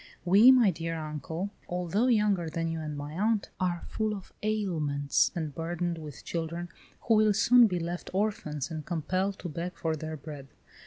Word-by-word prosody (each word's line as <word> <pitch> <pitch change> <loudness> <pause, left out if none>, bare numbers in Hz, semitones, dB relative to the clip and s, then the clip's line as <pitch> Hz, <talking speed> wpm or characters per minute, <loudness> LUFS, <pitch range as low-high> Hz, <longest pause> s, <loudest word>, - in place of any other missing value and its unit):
We, 200 +7 +7
my 245 -6 +7
dear 165 0 -4
uncle, 160 +5 -4 0.2
although 180 +6 0
younger 210 -8 +2
than 165 +1 -2
you 165 0 -3
and 150 -2 -5
my 145 +1 -6
aunt, 210 +4 0
are 175 -2 -1
full 215 -1 -1
of 195 - -11
ailments 160 -10 +1
and 155 -4 -3
burdened 170 +2 -2
with 150 -3 -9
children, 170 +1 -3 0.3
who 230 - +2
will 215 -1 +4
soon 240 +2 +6
be 180 -3 -1
left 175 +1 -4
orphans 180 -8 -2
and 155 -1 -4
compelled 185 +5 -1
to 180 - -6
beg 170 +2 -5
for 160 -1 -1
their 155 +1 -5
bread. 145 -2 -9
175 Hz, 175 wpm, -29 LUFS, 155-200 Hz, 0.3 s, We